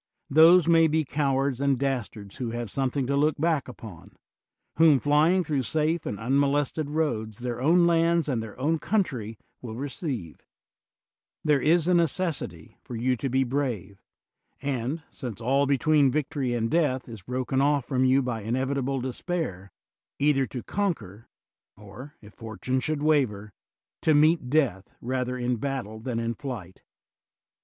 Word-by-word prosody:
Those 165 +4 +7
may 165 -1 +5
be 155 0 0
cowards 135 -2 0
and 140 -1 +2
dastards 120 -7 -4
who 125 -3 -3
have 120 -3 -5
something 135 0 -1
to 140 +2 0
look 150 +2 +2
back 160 -2 0
upon; 110 -9 -11 0.6
whom, 160 -3 +6
flying 155 +7 +3
through 145 -5 -1
safe 155 +7 -1
and 100 - -4
unmolested 140 +4 0
roads, 115 -9 -2
their 120 -1 -4
own 170 +5 +4
lands 170 -1 +2
and 125 -6 -1
their 110 +1 -9
own 155 +4 +1
country 125 - -1 0.2
will 115 -3 -7
re 140 +4 -4
ceive: 125 - -5 1.0
there 150 -3 +3
is 165 +3 +3
a 180 - +3
necessity 160 - -1
for 120 - -8
you 125 +3 +1
to 135 - -3
be 130 +1 +2
brave, 120 -8 -3 0.6
and, 140 +3 -3
since 120 -7 -7
all 135 +4 +1
between 140 +1 +3
victory 140 -3 -1
and 115 -1 -1
death 145 -6 +1
is 115 -4 -9
broken 130 +5 -1
off 145 -2 +2
from 130 -2 0
you 130 +1 +4
by 120 -3 -3
inevitable 130 +4 -1
despair, 125 - -4 0.5
either 140 -2 +2
to 125 - -6
conquer, 155 - -3 0.5
or, 120 +9 -12
if 105 0 -14
fortune 115 +3 -3
should 150 +2 -2
waver, 110 -10 +1 0.5
to 155 - +3
meet 155 -3 +3
death 125 -10 0
rather 125 0 -2
in 125 0 -1
battle 120 -4 -4
than 115 +1 -4
in 115 0 -2
flight. 115 -8 -8
135 Hz, 155 wpm, -26 LUFS, 120-150 Hz, 1.0 s, Those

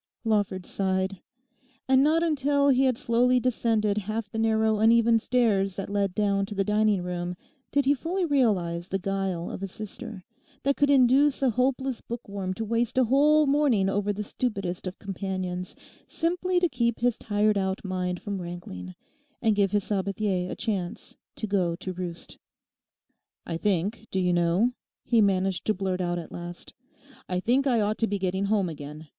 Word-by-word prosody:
Lawford 205 -4 0
sighed. 190 0 -1 0.7
And 265 0 +5
not 320 +3 +3
until 285 -3 +2
he 265 0 +4
had 255 -3 +2
slowly 245 +2 +3
descended 225 -4 +1
half 215 +1 -4
the 225 - -3
narrow 220 -1 +2
uneven 230 +1 +5
stairs 210 -6 +1
that 195 0 -5
led 200 -2 0
down 200 -2 +1
to 210 - -7
the 195 - +1
dining 210 -2 +2
room 180 0 -3 0.4
did 285 -1 +2
he 280 - +5
fully 350 +6 -2
realise 190 - +1
the 195 - -1
guile 195 -2 -2
of - - -6
a 195 - -2
sister 215 +1 -8 0.4
that 280 0 +2
could 285 - +2
induce 275 +1 +4
a 260 - +4
hopeless 255 +1 0
bookworm 200 -5 -5
to 225 - -3
waste 235 +3 -1
a 260 - +6
whole 295 +5 +4
morning 275 -9 +3
over 205 +1 0
the 210 +1 -4
stupidest 195 -6 -3
of 185 - -6
companions, 185 -2 -4 0.3
simply 355 +2 0
to 355 - +3
keep 235 -5 -1
his 245 -1 +2
tired 210 0 +1
out 190 0 -1
mind 180 -1 -3
from 200 -3 -3
rankling, 95 - -7 0.4
and 220 -3 +2
give 200 -1 +3
his 205 0 0
Sabathier 195 -2 -1
a - - -4
chance 190 -5 -4 0.2
to - - -4
go 185 -5 0
to 185 +1 -6
roost. 175 -1 -7 1.1
'I 165 - -3
think, 205 +4 -1
do 190 - -1
you 180 -1 +2
know,' 175 +7 +2 0.3
he 235 -2 +3
managed 190 -2 +1
to 215 - +1
blurt 185 -1 -2
out 175 -1 -1
at 170 - -7
last 175 0 -8 0.6
'I 180 -1 0
think 260 +7 +2
I 240 -4 +3
ought 210 +1 -1
to 225 - +2
be 205 - -1
getting 190 +1 -1
home 200 -2 +1
again. 150 0 -8
205 Hz, 175 wpm, -27 LUFS, 185-240 Hz, 1.1 s, a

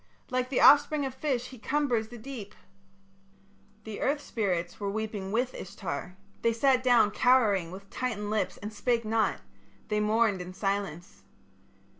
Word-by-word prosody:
Like 255 0 0
the 265 - +1
offspring 290 0 +6
of 265 - -4
fish 260 -3 -2
he 255 - -12
cumbers 250 -4 0
the 240 +1 -10
deep.' 230 -4 -8 1.3
"The 215 -1 -7
earth 290 +2 +1
spirits 185 -10 -2
were 200 -1 -2
weeping 205 -2 -4
with 245 +4 0
Ishtar: 180 -2 -6 0.2
they 230 - +2
sat 255 +2 +3
down 240 -4 +4
cowering 210 -8 +3
with 195 +2 -10
tightened 215 -5 -3
lips 215 -1 -1
and 210 +1 -7
spake 235 +1 0
not; 220 -2 +1 0.5
they 210 - +1
mourned 210 -2 +2
in 180 +1 -8
silence. 195 -2 -3
220 Hz, 150 wpm, -29 LUFS, 200-250 Hz, 1.3 s, offspring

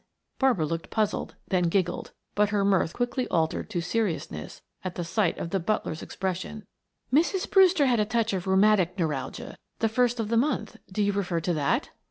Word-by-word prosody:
Barbara 250 - +3
looked 165 +2 -4
puzzled, 215 -2 -1
then 180 -2 +2
giggled, 175 0 0 0.2
but 210 0 +2
her 205 -1 +1
mirth 190 -4 +3
quickly 245 +3 -1
altered 160 -2 0
to 175 - -2
seriousness 170 - -3 0.2
at 185 -1 -5
sight 180 +1 +1
of 165 - -5
the 195 - +1
butler's 170 -4 -2
expression. 190 +3 -4 0.5
"Mrs. 345 +6 +2
Brewster 375 -6 +5
had 245 -3 +3
a 210 - +3
touch 225 0 0
of 190 0 -3
rheumatic 190 -1 +4
neuralgia 155 -7 -3 0.2
the 225 - +2
first 245 +1 +1
of 215 -2 -1
the 230 - +2
month; 235 -4 0
do 210 +2 0
you 205 - +2
refer 180 -4 -1
to 175 +2 0
that?" 145 -3 0
200 Hz, 180 wpm, -27 LUFS, 175-230 Hz, 0.5 s, Brewster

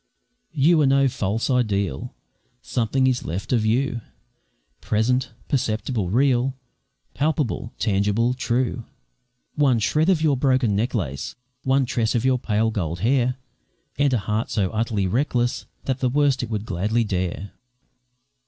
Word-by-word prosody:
You 155 +3 +4
are 145 - +4
no 135 0 +4
false 115 -4 -1
ideal, 100 - -1 0.5
Something 130 +2 0
is 130 -1 +1
left 90 +9 -3
of 115 -3 +2
you, 120 +1 0 0.8
Present, 125 +3 0 0.2
perceptible, 110 -6 -1
real, 130 +3 +2 0.6
Palpable, 145 -6 -1
tangible, 105 +3 +1
true; 125 -1 -1 0.7
One 140 -5 +3
shred 155 - +1
of 185 -4 +4
your 155 -3 +2
broken 130 -5 +2
necklace, 100 - -2 0.3
One 135 0 +2
tress 115 -2 0
of 120 +1 0
your 130 -1 +3
pale, 110 0 0
gold 85 -5 -3
hair, 125 +2 +2 0.6
And 145 -1 +3
a 125 - +3
heart 105 +2 -2
so 95 -4 0
utterly 110 -3 -1
reckless, 120 +3 0 0.2
That 130 -1 -1
the 130 - +1
worst 140 0 +2
it 120 - -4
would 105 -2 -3
gladly 110 +6 0
dare. 95 -1 -3
120 Hz, 135 wpm, -23 LUFS, 105-130 Hz, 0.8 s, You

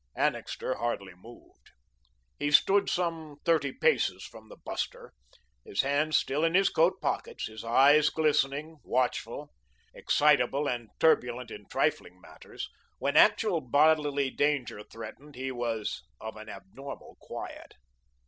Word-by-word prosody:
Annixter - - -1
hardly 105 -5 -3
moved. 90 - -17 0.7
He 145 - 0
stood 195 +7 +4
some 165 -4 -2
thirty 155 -5 +2
paces - - +1
from - - -13
the - - -11
buster, - - -5 0.5
his 100 - 0
hands 145 +3 +2
still 145 +4 -1
in 165 +1 +2
his 195 +1 +5
coat 165 +3 +2
pockets, - - -2
his 110 0 -8
eyes 145 +6 +5
glistening, 150 0 0
watchful. 125 +2 -2 0.4
Excitable 145 -1 +2
and 120 -4 -3
turbulent 125 -6 +2
in 105 -1 -10
trifling 90 - -1
matters, 80 -3 -9 0.3
when - - -1
actual 165 - +4
bodily 145 0 +2
danger 145 -7 0
threatened 115 +7 -11
he 130 +1 -4
was 115 - -3 0.2
of 110 -1 -7
an 110 0 -10
abnormal 140 - -10
quiet. - - -8
140 Hz, 130 wpm, -29 LUFS, 120-150 Hz, 0.7 s, his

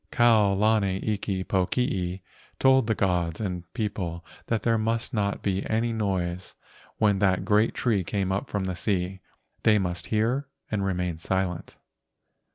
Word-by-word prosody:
Kau 115 -4 +4
lana 100 -2 +2
iki 100 -3 -1
pokii 95 -1 0 0.4
told 130 -3 +4
the 110 - +1
gods 90 -4 0
and 90 -5 -4
people 90 -7 -3 0.2
that 110 -3 0
there 115 -1 +2
must 115 +4 -1
not 100 -3 -1
be 95 -1 0
any 115 +1 +1
noise 95 -4 -2 0.4
when 105 -3 +3
that 95 -2 +2
great 105 +1 +3
tree 110 -6 +1
came 95 +3 -1
up 95 - -2
from 100 -2 -1
the 95 -1 -2
sea. 95 0 -1 0.4
They 110 -1 +5
must 90 -3 -2
hear 120 +6 0 0.2
and 105 -2 0
remain 90 -3 -1
silent. 95 0 -2
100 Hz, 150 wpm, -26 LUFS, 90-110 Hz, 0.4 s, They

